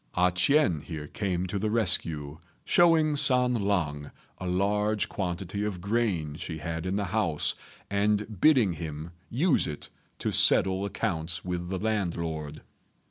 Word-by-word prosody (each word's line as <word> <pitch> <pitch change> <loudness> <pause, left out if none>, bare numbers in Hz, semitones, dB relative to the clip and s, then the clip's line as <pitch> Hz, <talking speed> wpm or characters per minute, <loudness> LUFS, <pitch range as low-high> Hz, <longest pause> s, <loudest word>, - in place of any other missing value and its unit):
A 90 0 +3
ch'ien 90 - +2
here 75 0 -7
came 90 +2 -2
to 95 +2 -3
the 105 +2 -1
rescue, 80 -9 0 0.3
showing 160 -3 +4
San 125 -3 +3
lang 90 -10 -1 0.3
a 95 - -4
large 105 +3 +1
quantity 95 +1 -3
of 105 -4 -3
grain 100 -7 -1
she 80 -2 -5
had 80 +2 -4
in 95 - -1
the 100 0 -1
house, 90 -6 0 0.3
and 105 0 0
bidding 125 - +5
him 80 0 -6 0.2
use 150 +6 +2
it 75 -2 -7 0.3
to - - -2
settle 95 +1 +4
accounts 85 -4 -2
with 90 -1 -3
the 95 - -2
landlord. 85 -8 -3
95 Hz, 140 wpm, -28 LUFS, 85-105 Hz, 0.3 s, bidding